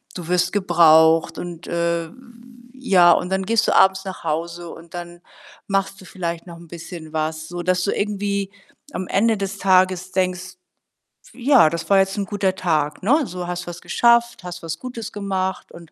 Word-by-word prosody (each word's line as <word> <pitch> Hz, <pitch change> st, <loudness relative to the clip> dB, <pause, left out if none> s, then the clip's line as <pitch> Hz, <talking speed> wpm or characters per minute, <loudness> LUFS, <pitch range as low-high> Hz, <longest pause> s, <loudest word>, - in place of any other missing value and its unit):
du 175 Hz, -3 st, -7 dB
wirst 180 Hz, 0 st, +1 dB
gebraucht 165 Hz, -4 st, +4 dB
und, 175 Hz, -1 st, -8 dB
äh, 170 Hz, -1 st, -1 dB, 0.6 s
ja 190 Hz, -10 st, +4 dB
und 180 Hz, -, -1 dB
dann 190 Hz, 0 st, -1 dB
gehst 225 Hz, +2 st, +2 dB
du -, -, +2 dB
abends 190 Hz, 0 st, +4 dB
nach 190 Hz, -1 st, -7 dB
Hause 170 Hz, +2 st, -3 dB
und 170 Hz, +1 st, -14 dB
dann 175 Hz, 0 st, -8 dB, 0.5 s
machst 195 Hz, 0 st, -1 dB
du -, -, -13 dB
vielleicht 170 Hz, -2 st, -5 dB
noch 170 Hz, -1 st, -10 dB
'n 170 Hz, 0 st, -14 dB
bisschen 165 Hz, -1 st, -9 dB
was, 155 Hz, 0 st, -3 dB
so, 175 Hz, +1 st, -6 dB
dass 180 Hz, 0 st, +1 dB
du 200 Hz, -, 0 dB
irgendwie 200 Hz, -1 st, -2 dB, 0.4 s
am 185 Hz, 0 st, -4 dB
Ende 225 Hz, +2 st, +2 dB
des 195 Hz, 0 st, -4 dB
Tages 185 Hz, -1 st, +2 dB
denkst: 185 Hz, -1 st, -2 dB, 0.8 s
„Ja, 260 Hz, -, +4 dB
das 165 Hz, 0 st, -5 dB
war 195 Hz, -1 st, +5 dB
jetzt 195 Hz, +1 st, 0 dB
'n 200 Hz, -, -1 dB
guter 190 Hz, -2 st, -1 dB
Tag“, 155 Hz, -3 st, -1 dB
ne? 280 Hz, +10 st, +3 dB
So, 180 Hz, 0 st, -6 dB
hast 175 Hz, 0 st, -5 dB
was 175 Hz, 0 st, -7 dB
geschafft, 235 Hz, -3 st, +2 dB
hast 180 Hz, -1 st, -8 dB
was 160 Hz, -1 st, -5 dB
Gutes 245 Hz, -4 st, -7 dB
gemacht 190 Hz, -2 st, -3 dB
und 170 Hz, -2 st, -14 dB
180 Hz, 180 wpm, -21 LUFS, 170-195 Hz, 0.8 s, war